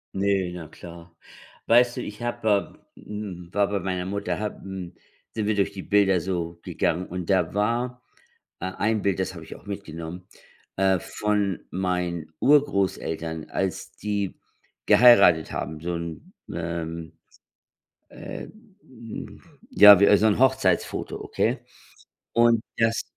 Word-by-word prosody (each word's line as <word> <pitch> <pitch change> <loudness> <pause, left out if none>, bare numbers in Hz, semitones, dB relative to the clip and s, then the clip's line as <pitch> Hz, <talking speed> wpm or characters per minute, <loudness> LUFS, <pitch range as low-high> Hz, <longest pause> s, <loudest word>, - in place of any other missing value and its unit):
Ne, 95 -2 +1
na 85 -3 -7
klar. 85 +1 -12 0.6
Weißt 120 +1 +4
du, - - -2
ich 105 +2 -8
habe 110 -4 -1 0.2
äh, - - -16
hm, 95 -5 -7
war 100 -1 +3
bei 100 -1 -1
meiner 90 0 -3
Mutter 100 +2 -3
habe, 105 -1 -4
hm 95 -2 -7 0.4
sind 110 -2 -2
wir 105 0 +1
durch 100 - +1
die 95 -2 -8
Bilder 100 -3 +3
so 85 -1 -3
gegangen 90 +3 -1
und 90 -1 -6
da 95 -4 +2
war, 120 +4 -1 0.6
äh, 95 +1 -3
ein 110 0 +1
Bild, 100 -3 0
das - - -2
habe - - -9
ich - - -9
auch - - -16
mitgenommen, 90 -3 -7 0.5
äh, 95 -1 +3
von 105 0 -1
meinen 90 -3 -2
Urgroßeltern, 95 - +1
als 95 -3 -3
die 100 -2 -3 0.5
geheiratet 105 -10 +6
haben, 80 - -4
so 85 +1 -3
‘n, 85 - -7 0.2
ähm, 85 -1 -4 1.0
äh, - - -8 0.4
hm, 115 -3 -10 0.3
ja 100 -2 +9
wie 100 0 +6
so 105 +2 +3
‘n 105 - +2
Hochzeitsfoto, 130 -9 +1
okay, - - -1 0.8
und 115 -1 +4 0.2
das 115 0 +1
95 Hz, 140 wpm, -25 LUFS, 85-105 Hz, 1.0 s, ja